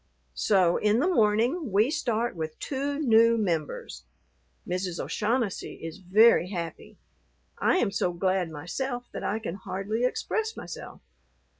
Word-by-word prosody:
So 185 Hz, -5 st, +3 dB
in 210 Hz, +1 st, +2 dB
the 305 Hz, -, +2 dB
morning 235 Hz, -, +2 dB
we 215 Hz, +8 st, +3 dB
start 240 Hz, -, -1 dB
with 160 Hz, -1 st, -5 dB
two 280 Hz, +1 st, -3 dB
new 230 Hz, -5 st, +5 dB
members. 165 Hz, -, -2 dB, 0.6 s
Mrs. 180 Hz, -1 st, -2 dB
O'Shaughnessy 225 Hz, -2 st, -1 dB
is 165 Hz, -1 st, -8 dB
very 190 Hz, 0 st, +5 dB
happy. 170 Hz, -4 st, -6 dB, 0.6 s
I -, -, +3 dB
am 220 Hz, -, +1 dB
so 190 Hz, -3 st, 0 dB
glad 185 Hz, 0 st, 0 dB
myself 245 Hz, -, -4 dB
that -, -, -6 dB
I 210 Hz, -, 0 dB
can 215 Hz, -6 st, -5 dB
hardly 195 Hz, +4 st, -3 dB
express 440 Hz, -, -1 dB
myself. 170 Hz, -, -8 dB
210 Hz, 135 wpm, -27 LUFS, 180-245 Hz, 0.6 s, new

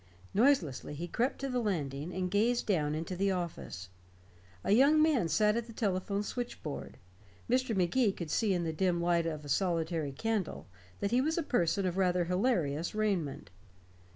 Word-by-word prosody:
Noiselessly 195 Hz, -, +2 dB
he 170 Hz, +4 st, -4 dB
crept 245 Hz, +9 st, 0 dB
to 275 Hz, -, -1 dB
the 250 Hz, -2 st, -1 dB
landing, 155 Hz, -, -2 dB
and 185 Hz, 0 st, -2 dB
gazed 230 Hz, +4 st, +2 dB
down 155 Hz, -7 st, +1 dB
into 165 Hz, +4 st, -4 dB
the 195 Hz, +2 st, +1 dB
office. 170 Hz, -, -4 dB, 0.7 s
A -, -, 0 dB
young 280 Hz, +8 st, +6 dB
man 305 Hz, -, +3 dB
sat 210 Hz, +7 st, +3 dB
at 235 Hz, 0 st, -2 dB
the 230 Hz, -, -10 dB
telephone 200 Hz, -1 st, -1 dB
switchboard; 210 Hz, -, -5 dB, 0.5 s
Mr. 250 Hz, -2 st, +1 dB
Magee 200 Hz, +5 st, +2 dB
could 170 Hz, -5 st, -6 dB
see 215 Hz, -3 st, +2 dB
in 175 Hz, -2 st, +1 dB
the 160 Hz, -1 st, -2 dB
dim 175 Hz, +1 st, +1 dB
light 170 Hz, -1 st, +2 dB
of 155 Hz, -2 st, -4 dB
a -, -, -7 dB
solitary 165 Hz, -2 st, 0 dB
candle 215 Hz, +4 st, -2 dB, 0.4 s
that 200 Hz, -, 0 dB
he 245 Hz, +2 st, +4 dB
was 315 Hz, +4 st, 0 dB
a 335 Hz, -, +1 dB
person 195 Hz, -, +1 dB
of 180 Hz, 0 st, -1 dB
rather 180 Hz, -2 st, +2 dB
hilarious 180 Hz, -, 0 dB
raiment. 175 Hz, -, -1 dB
185 Hz, 175 wpm, -31 LUFS, 165-225 Hz, 0.7 s, young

